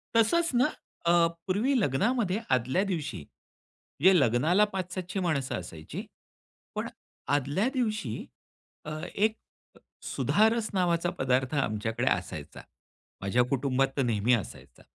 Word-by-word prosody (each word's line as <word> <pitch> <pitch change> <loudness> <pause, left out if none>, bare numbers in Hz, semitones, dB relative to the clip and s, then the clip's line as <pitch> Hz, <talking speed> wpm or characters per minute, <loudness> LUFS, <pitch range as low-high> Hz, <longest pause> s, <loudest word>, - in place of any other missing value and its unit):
तसंच 330 +8 +3
ना 250 - +5 0.4
अ, 170 - +4 0.4
पूर्वी 220 +9 +1
लग्नामध्ये 205 - +1 0.2
आदल्या 130 +10 +1
दिवशी 155 - -3
म्हणजे 180 - -1
लग्नाला 150 - +4
पाच-सातशे 185 0 -3
माणसं 145 -7 0
असायची. 80 -2 -8 0.7
पण - - -2 0.5
आदल्या 145 - +1
दिवशी 215 - -1 0.7
अ, 155 - -5 0.2
एक 215 +2 +3
अ, 225 - -29 0.7
सुधारस 220 +1 +2
नावाचा 175 -2 +1
पदार्थ 130 +1 +1
आमच्याकडे 115 -1 -1
असायचा. 80 -4 -4 0.6
माझ्या 115 +6 +2
कुटुंबात 135 0 +1
तर - - +3
नेहमी 115 +1 +2
असायचा. 115 - -4
155 Hz, 110 wpm, -28 LUFS, 125-205 Hz, 0.7 s, ना